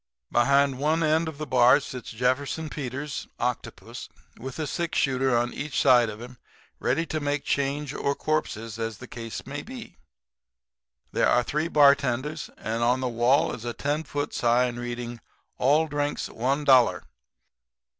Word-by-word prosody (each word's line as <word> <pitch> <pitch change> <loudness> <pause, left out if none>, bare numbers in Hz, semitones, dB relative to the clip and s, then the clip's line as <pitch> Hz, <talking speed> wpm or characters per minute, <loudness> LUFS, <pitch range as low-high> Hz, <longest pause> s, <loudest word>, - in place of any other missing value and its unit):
"Behind 140 +2 +3
one 155 +3 +1
end 160 +1 +2
of 160 -3 -6
the 155 - -4
bar 125 0 +5
sits 130 -3 -8
Jefferson 130 +6 -1
Peters, 140 +1 -5
octopus, - - -4 0.3
with 130 +2 -7
a 155 - -2
sixshooter 135 -6 0
on 120 +1 -1
each 145 0 -3
side 125 -4 +5
of 105 0 -8
him, 120 +1 -11 0.4
ready 165 - 0
to 155 0 -3
make 145 -1 -1
change 140 0 -1
or 140 - -1
corpses 115 -8 -2
as 115 -2 -3
the 125 - -10
case 115 -2 -7
may 145 +1 -5
be. 245 - -10 1.1
There - - +2
are 120 - +3
three 150 +6 -1
bartenders; 140 -1 +3
and 115 +1 -3
on 125 +2 +2
the 130 - -1
wall 120 +4 +2
is 115 - -7
a 120 -1 -3
ten 145 +5 -2
foot 145 -1 -4
sign 120 0 +2
reading: 120 -1 -5 0.4
'All 150 +5 +3
Drinks 145 0 -2
One 135 +5 -1
Dollar.' 125 -10 +5
135 Hz, 155 wpm, -26 LUFS, 120-150 Hz, 1.1 s, bar